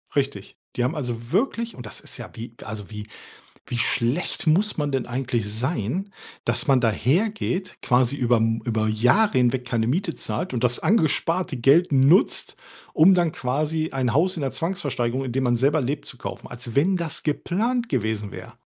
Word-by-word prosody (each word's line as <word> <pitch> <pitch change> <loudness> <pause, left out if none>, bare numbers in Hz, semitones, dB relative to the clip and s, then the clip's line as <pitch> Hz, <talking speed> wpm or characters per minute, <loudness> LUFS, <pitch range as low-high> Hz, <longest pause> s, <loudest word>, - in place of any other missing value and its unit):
Richtig. 140 0 -2 0.2
Die 120 - 0
haben 135 +7 0
also 120 -4 -5
wirklich 230 +3 0
und 125 - -9
das 105 - -6
ist - - -8
ja - - -8
wie 115 +1 -8
also, 105 -1 -7
wie 105 0 -7 0.6
wie 120 - -3
schlecht 120 +8 0
muss 200 +7 +3
man 145 -1 -1
denn 135 -3 -1
eigentlich 120 -3 -2
sein, 130 - -2 0.3
dass - - 0
man 135 -3 +4
dahergeht, 185 - 0
quasi 125 +1 +3
über 125 -3 +2
M 115 0 +1
über 110 -2 0
Jahre 125 - +3
hinweg 125 0 +2
keine 115 -2 0
Miete 170 +6 -1
zahlt 175 -5 -3
und 120 - -2
das 120 -1 +2
angesparte 165 - +1
Geld 145 +8 +4
nutzt, 140 +8 +3 0.4
um 170 +5 +6
dann 175 -3 +2
quasi 155 +5 -1
ein 130 -3 0
Haus 185 +5 +3
in 160 - -4
der 135 - -1
Zwangsversteigerung, 135 -8 -2
in 125 - -3
dem 130 +2 0
man 120 -1 +2
selber 145 +5 +2
lebt, 135 +4 -3
zu 125 - -8
kaufen, - - -7
als 120 -1 -8
wenn 185 +7 +3
das 165 -2 -4
geplant 230 +11 -1
gewesen 110 - -2
wär. - - -10
135 Hz, 185 wpm, -24 LUFS, 120-170 Hz, 0.6 s, um